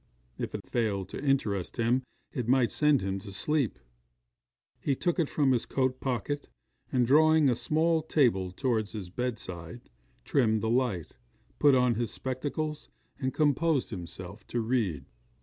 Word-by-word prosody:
If - - -3
it - - -6
failed 100 -5 -1
to - - -6
interest 110 -10 0
him, 120 +2 +2 0.3
it 125 -3 -3
might 125 -1 +3
send 150 -7 +3
him 95 0 -2
to 100 +1 -9
sleep. 135 +6 0 1.0
He 140 - 0
took 175 +5 0
it 160 - +1
from 140 -3 +2
his 120 -3 +1
coat 130 -1 0
pocket, 135 +3 -2 0.4
and 125 -2 +3
drawing 155 +3 +5
a 125 - +4
small 160 +6 +1
table 120 - +2
towards 110 0 -1
his 95 -5 -6
bedside, 110 - -5 0.3
trimmed 110 - +2
the 110 - 0
light, 120 -9 0 0.5
put 145 -2 +6
on 125 -1 +4
his 115 0 -1
spectacles, 145 +4 -4 0.3
and 130 -1 -1
composed 150 -1 +1
himself 95 +1 -7
to 120 - -2
read. 110 - 0
125 Hz, 150 wpm, -29 LUFS, 105-145 Hz, 1.0 s, put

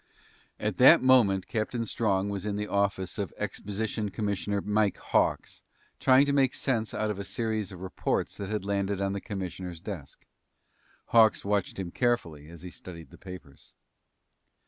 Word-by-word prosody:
At - - -2
that - - +8
moment 110 -8 +4
Captain 115 +2 -2
Strong 100 -3 0
was 100 -2 -4
in 105 -1 -2
the 105 0 -2
office 100 -2 -1
of 100 -5 -2
Exposition 105 +1 -3
Commissioner 100 -1 -2
Mike 105 0 +1
Hawks - - 0 0.4
trying 130 +1 +5
to 140 - 0
make 135 -2 +3
sense 115 -5 -1
out 110 0 0
of 100 - -5
a - - -3
series 110 0 -2
of 90 -2 -10
reports 95 -1 -2
that 100 -1 -5
had 105 -2 -2
landed 100 -1 -1
on 100 0 0
the 100 - -4
commissioner's 90 -3 -6
desk. 85 -7 -8 0.8
Hawks 110 -3 +5
watched 100 -2 0
him 95 -3 -4
carefully 85 - -1
as 85 0 -12
he 90 - -7
studied 85 -1 -11
the - - -15
papers. 90 -7 -12
100 Hz, 165 wpm, -28 LUFS, 95-110 Hz, 0.8 s, that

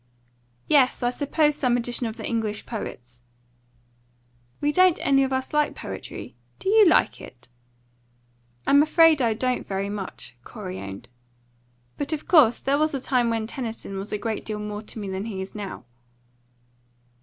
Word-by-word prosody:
"Yes; 270 -4 +3
I 245 - +2
suppose 295 +2 +1
some 250 -4 +1
edition 240 0 -2
of 220 - -6
the - - -6
English 220 -3 -2
poets." 120 - -7 1.4
"We 290 - +1
don't 365 +1 +4
any 275 -1 +4
of 265 - -1
us 260 +2 -2
like 300 0 +1
poetry. - - -8 0.2
Do 385 - -3
you 430 -1 +7
like 335 - +3
it?" 125 0 -14 1.2
"I'm 285 +1 +6
afraid 315 -1 +5
I 230 -3 +2
don't 255 +2 -1
very 195 0 -2
much," 195 -10 -7
Corey 190 - -7
owned. 100 0 -8 0.9
"But, 285 +2 -2
of 305 - -5
course, 285 -10 +5
there 280 +1 +1
was 310 -1 +1
a - - -1
time 250 -2 +1
when 225 -1 -1
Tennyson 225 -5 -5
was 200 +2 -6
a 210 - -1
great 220 +1 -3
deal 215 -1 -4
more 210 0 -5
to 220 - -8
me 205 -2 -5
than 190 +1 -4
he 210 -4 -5
is 190 +1 -6
now." 200 - -7
235 Hz, 165 wpm, -25 LUFS, 205-285 Hz, 1.4 s, you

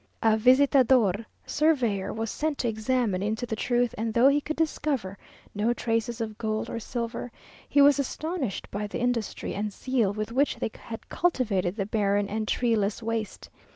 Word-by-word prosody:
A 220 -1 +5
visitador 250 -4 +4 0.2
(surveyor) 250 -11 +1
was 225 0 -3
sent 305 -1 -2
to 245 - -1
examine 220 -3 0
into 220 +4 -1
the 225 - -3
truth, 245 +1 +1
and 225 0 -2
though 245 +3 +6
he 290 +1 +2
could 310 +2 -4
discover 290 -10 -1 0.4
no 215 +3 +1
traces 230 0 -1
of 220 -2 -4
gold 215 -1 -2
or 230 - -3
silver, 235 +1 -4 0.4
he 285 - +5
was 285 -1 +6
astonished 280 - -3
by 210 +1 -3
the 205 - -5
industry 240 -3 -2
and 210 +1 -2
zeal 240 -2 0
with 215 +2 -4
which 275 +4 +2
they - - -3
had 225 -1 -9
cultivated 205 - 0
the 200 -3 -2
barren 205 -1 +1
and 215 +1 -3
treeless 225 -3 0
waste. 225 -2 -4
230 Hz, 170 wpm, -27 LUFS, 215-255 Hz, 0.4 s, though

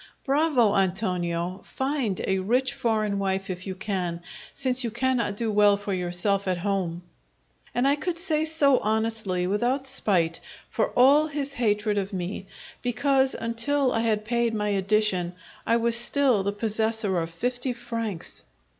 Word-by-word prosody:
"Bravo, 275 -6 +3
Antonio! 180 -2 0
Find 265 -8 -2
a 190 0 +1
rich 245 +6 +1
foreign 215 -3 0
wife 195 0 -1
if 185 +1 -6
you 190 - -4
can, 185 -4 -3 0.3
since 260 -1 0
you 235 - -1
cannot 235 -3 0
do 225 -1 0
well 205 -1 +5
for 200 0 -4
yourself 185 +2 0
at 185 -1 +1
home!" 180 -2 -2 0.7
And 245 +2 +2
I 285 +1 +3
could 340 +2 -3
say 320 -3 0
so 285 -5 +3
honestly, 220 -4 -1
without 240 +8 0
spite, 185 -11 +1 0.3
for - - 0
all 280 +5 +6
his 285 -2 -3
hatred 210 -4 +1
of 195 +1 -4
me, 185 +1 -4 0.3
because, 265 +2 +2
until 255 +4 0
I - - +1
had 215 -2 0
paid 235 0 0
my 210 -1 -1
addition, 195 -3 +1 0.3
I 230 - +4
was 235 0 +1
still 240 -1 +2
the 200 +1 -1
possessor 220 -2 -1
of 165 -1 -3
fifty 245 +9 -2
francs! 230 -6 -5
220 Hz, 155 wpm, -26 LUFS, 190-250 Hz, 0.7 s, all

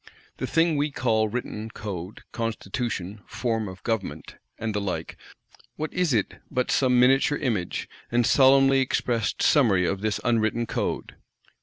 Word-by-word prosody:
The - - -3
thing 165 -2 +2
we 145 +1 +1
call 115 -5 +1
written 110 -1 -4
Code, 100 -3 -7
Constitution, 115 -3 -3
Form 115 -3 -2
of 95 -1 -10
Government, 95 -10 -3 0.2
and 110 -1 -3
the 105 - -1
like, 95 -2 -4 0.6
what 155 0 -4
is 180 -4 +1
it 110 -5 0
but 125 -3 -1
some 125 -2 +3
miniature 135 +3 +4
image, 105 -9 -2 0.2
and 120 0 +3
solemnly 135 +1 +5
expressed 120 -3 0
summary 105 - +4
of 100 +2 -1
this 110 -1 -1
unwritten 115 -1 +1
Code? - - -3
115 Hz, 145 wpm, -25 LUFS, 105-130 Hz, 0.6 s, solemnly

